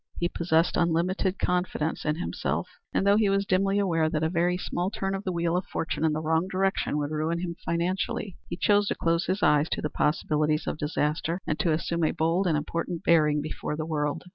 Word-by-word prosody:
He 175 - +1
possessed 165 -1 +1
unlimited 180 +3 +1
confidence 180 -3 -1
in 150 -1 +1
himself, 175 - -2 0.2
and - - 0
though 200 +1 +5
he 215 -2 +3
was 195 0 +1
dimly 195 +1 +2
aware 165 -6 +2
that 155 -1 -1
a 160 - +1
very 175 +1 +1
small 180 0 -2
turn 195 -1 -3
of 195 +1 -3
the 185 - -2
wheel 170 -1 0
of 180 - -1
fortune 160 - -3
in 160 - +3
the 155 +1 -2
wrong 160 +3 +1
direction 190 -4 0
would 145 0 -2
ruin 160 +2 -1
him 170 -2 -4
financially, 180 +2 -2
he 170 - -4
chose 205 +1 +3
to - - 0
close 165 0 0
his 190 +2 -1
eyes 150 +1 +4
to - - -2
the 150 - -2
possibilities 150 0 +1
of - - -3
disaster 150 +3 -1
and 155 - -2
to 170 - +2
assume 170 +1 -1
a 155 - +3
bold 170 +4 +1
and 160 -3 +2
important 170 +3 -3
bearing 150 -3 +3
before 155 0 -4
the 155 0 -3
world. 150 -2 -2
170 Hz, 220 wpm, -27 LUFS, 155-185 Hz, 0.2 s, though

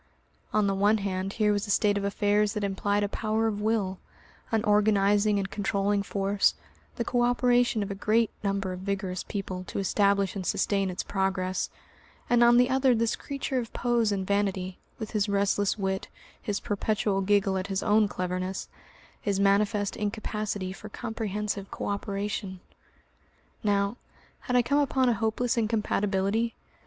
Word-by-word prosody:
On 215 -1 +2
the 195 - +1
one 205 +3 +3
hand 195 -1 -3
here 210 -1 +2
was 205 0 -1
a - - -9
state 205 0 +3
of 200 - -1
affairs 205 +1 +1
that 210 - -3
implied 200 +1 0
a - - +1
power 220 +2 -1
of 210 -2 -1
will, 210 -4 0 0.5
an 220 -2 +1
organising 205 -1 +3
and 195 -1 -2
controlling 200 0 0
force, 200 0 +1 0.4
the 235 - -2
co 245 0 +1
operation 245 -2 +3
of 200 - -5
a 195 - -7
great 225 +1 +2
number 195 -2 -1
of 180 - -6
vigorous 190 -1 -3
people 190 -3 -5
to - - -6
establish 200 0 +2
and 195 - -3
sustain 195 0 0
its 180 - -3
progress, 190 -1 -1 0.6
and 240 0 +5
on 240 0 +6
the 250 0 +5
other 260 -1 +3
this 230 0 +1
creature 275 -2 -3
of 230 -3 -5
pose 240 -3 +1
and 195 -2 -1
vanity, 190 -2 -1 0.2
with 220 -2 -6
his 210 -1 0
restless 200 +1 +1
wit, 190 -1 -2 0.3
his 205 -1 -2
perpetual 205 -1 0
giggle 195 0 +2
at 190 +1 -2
his 195 -1 -2
own 210 0 +4
cleverness, 185 0 -3 0.5
his 200 -4 0
manifest 200 +1 +2
incapacity 210 -2 -3
for 215 +2 -10
comprehensive 210 -3 -4
co - - -5
operation. 200 -1 -3 1.0
Now, 200 +1 +1 0.4
had 250 - -3
I 245 - +5
come 285 +4 +2
upon 265 -3 +2
a - - +3
hopeless 225 +3 0
incompatibility? 215 0 0
205 Hz, 165 wpm, -28 LUFS, 195-220 Hz, 1.0 s, on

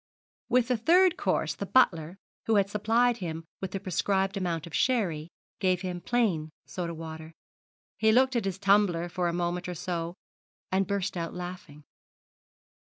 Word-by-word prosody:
With 250 0 +3
the 250 - +2
third 350 +9 +5
course - - 0
the - - -6
butler, 175 -8 +3 0.3
who 225 - +3
had 200 -1 +2
supplied 230 +3 +2
him 165 -4 -5 0.2
with 190 - -3
the 195 - -4
prescribed 195 +1 0
amount 175 -4 -2
of 170 - -12
sherry, 175 -11 +1 0.3
gave 185 -2 +1
him 180 -2 -4
plain 195 -11 +1 0.2
soda 170 -2 -4
water. 160 0 -8 0.7
He 220 0 +4
looked 260 +3 +4
at 230 -4 0
his 195 -1 -2
tumbler 195 -4 +3
for 175 0 -1
a - - +1
moment 175 +1 -2
or 180 - -4
so, 170 0 -3 0.6
and 190 +1 +2
burst 200 -1 -1
out 170 -1 -4
laughing. 180 -4 -8
185 Hz, 160 wpm, -28 LUFS, 170-210 Hz, 0.7 s, third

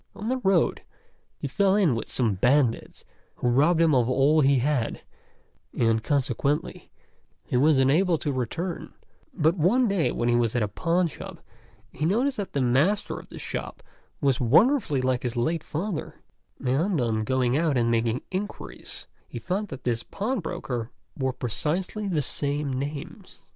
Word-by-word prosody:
On 215 +3 -4
the 260 - +1
road 195 -8 +2 0.6
he - - -4
fell 195 +7 +2
in 190 -10 +3
with 115 - -4
some 115 -5 +1
bandits, 125 +4 +1 0.3
who - - -2
robbed 150 +7 +3
him 165 -2 +4
of 125 -2 +3
all 140 +4 +4
he 140 -1 +4
had, 130 -2 0 0.8
and 115 -1 +2
consequently 140 +1 -1 0.6
he - - -3
was 145 +3 +4
unable 160 +7 +3
to 150 - -2
return; 160 +8 -4 0.4
but 165 - +2
one 235 +10 +3
day 195 -6 +1
when 120 - -1
he 120 - +3
was 120 -1 +1
at 120 - +2
a - - 0
pawnshop 170 - -2 0.5
he 150 - -6
noticed 245 - +1
that 200 -2 -4
the 140 - 0
master 140 +12 +1
of - - -15
the - - -10
shop - - -6 0.4
was 135 -4 +2
wonderfully 150 - +3
like 130 -1 +1
his 120 -1 -3
late 160 +7 0
father, 175 +3 -4 0.5
and 155 +8 +1
on 110 -3 0
going 125 +1 +1
out 155 -3 +1
and 115 -1 +2
making 115 +1 0
inquiries 185 - -6 0.2
he - - -8
found 185 - -2
that 135 -7 -9
this 120 -2 0
pawnbroker 160 - -3 0.3
bore 130 -2 -1
precisely 175 - -2
the 160 -6 0
same 145 +1 -1
names. 140 +2 -6
145 Hz, 160 wpm, -26 LUFS, 125-180 Hz, 0.8 s, him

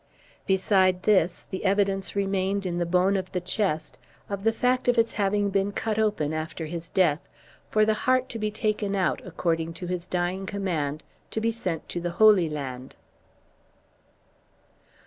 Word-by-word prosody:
Beside 190 -1 +3
this, 190 -5 +2
the 190 - -4
evidence 195 0 +1
remained 195 0 0
in 175 -1 -2
the 175 - 0
bone 180 +3 +3
of 185 -1 -3
the 180 - 0
chest 180 -3 -2 0.3
of 200 -1 -3
the 225 - +4
fact 250 +3 0
of 245 0 +3
its 230 0 +2
having 205 0 +1
been 195 +1 +1
cut 220 +1 -2
open 205 -9 +1
after 155 +1 -4
his 165 +1 -6
death, 165 -6 +3 0.5
for 215 0 +3
the 220 - +3
heart 255 +4 +1
to 230 - -5
be 215 0 0
taken 210 -2 -1
out, 185 -2 0
according 165 -2 -2
to 175 +2 -7
his 180 0 -4
dying 180 +2 -2
command, 160 -8 -2 0.3
to - - -2
be 230 +1 +1
sent 185 -8 -3
to 175 - -4
the 175 - -2
Holy 210 -6 +6
Land. 130 -4 -6
190 Hz, 165 wpm, -26 LUFS, 175-210 Hz, 0.5 s, Holy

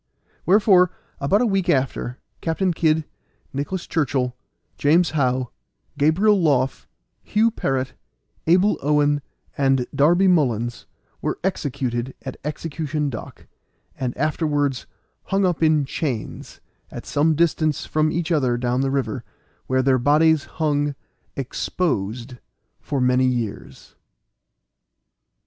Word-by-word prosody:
Wherefore, 190 -2 +5 0.3
about 190 - +2
a - - +3
week 195 -4 0
after, 130 -3 0 0.2
Captain 175 +2 0
Kid, 160 -1 +1 0.5
Nicholas 145 +7 -3
Churchill, 135 -5 -1 0.4
James 165 +4 +3
How, 130 -4 0 0.4
Gabriel 185 +8 +3
Loff, 135 -5 +1 0.3
Hugh 220 +2 +2
Parrot, 135 - -2 0.5
Abel 185 +5 +4
Owen, 145 0 +2 0.3
and 135 -2 +2
Darby 175 +7 +4
Mullins, 120 - +1 0.3
were - - -2
executed 135 -8 -2
at 130 - -6
Execution 150 -1 -3
Dock, 110 - -9 0.5
and 125 -2 -4
afterwards 145 -2 0 0.4
hung 195 0 +1
up 175 -3 0
in 155 -3 +3
chains, 135 -5 -4 0.3
at - - -8
some 155 +2 +2
distance 155 -2 +1
from 155 0 +1
each 170 +1 -2
other 130 -7 +2
down 125 +1 0
the 135 - +1
river, 135 -2 -2 0.4
where 130 0 +1
their 130 -1 +3
bodies 150 +3 +3
hung 145 -2 0 0.4
exposed 125 - -2 0.4
for 140 - -3
many 125 0 +3
years. 120 -4 -4
145 Hz, 115 wpm, -22 LUFS, 130-165 Hz, 0.5 s, Wherefore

